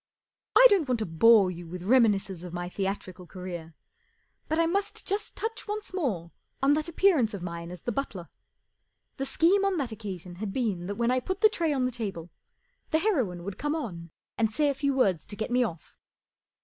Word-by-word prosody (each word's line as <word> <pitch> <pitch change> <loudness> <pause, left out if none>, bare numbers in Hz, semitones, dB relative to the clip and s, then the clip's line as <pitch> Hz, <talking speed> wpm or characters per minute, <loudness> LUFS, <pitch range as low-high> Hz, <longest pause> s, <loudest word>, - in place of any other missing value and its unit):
I - - +9
don't 350 -9 +3
want 250 - +2
to 220 - -2
bore 195 +3 +5
you 175 -1 -8
with 175 +1 -7
reminis¬ 220 -2 +4
cences 185 -3 -7
of 180 -1 -8
my 175 0 -4
theatrical 190 -2 -4
career, 175 -3 -7 0.7
but 315 - 0
I 330 - +4
must 390 +4 -1
just 410 +2 -3
touch 445 0 -4
once 420 -2 -5
more 205 - -2 0.3
on 275 +1 +4
that 305 +2 0
appearance 320 - +3
of 185 - -7
mine 170 -1 -5
as 180 -2 -9
the 240 - -1
butler. 205 -9 -4 0.9
The 270 -1 -2
scheme 375 +8 +3
on 395 -2 +1
that 275 -6 -1
occa¬ 210 -4 -6
sion 175 +1 -11
had 205 0 -4
been 200 -8 -1
that 205 - -3
when 235 +2 +1
I 255 - +2
put 375 +9 -4
the 435 - +7
tray 335 -7 0
on 265 -3 +1
the 255 - 0
table 195 -8 -5 0.6
the 315 - +3
heroine 255 - 0
would 200 +2 -6
come 295 +2 -1
on 175 - -5 0.3
and 220 -1 +2
say 295 +5 +2
a - - +1
few 280 0 0
words 195 - +2
to 205 - -8
get 220 +3 -4
me 250 +1 +4
off. 170 -9 -6
225 Hz, 215 wpm, -28 LUFS, 180-300 Hz, 0.9 s, I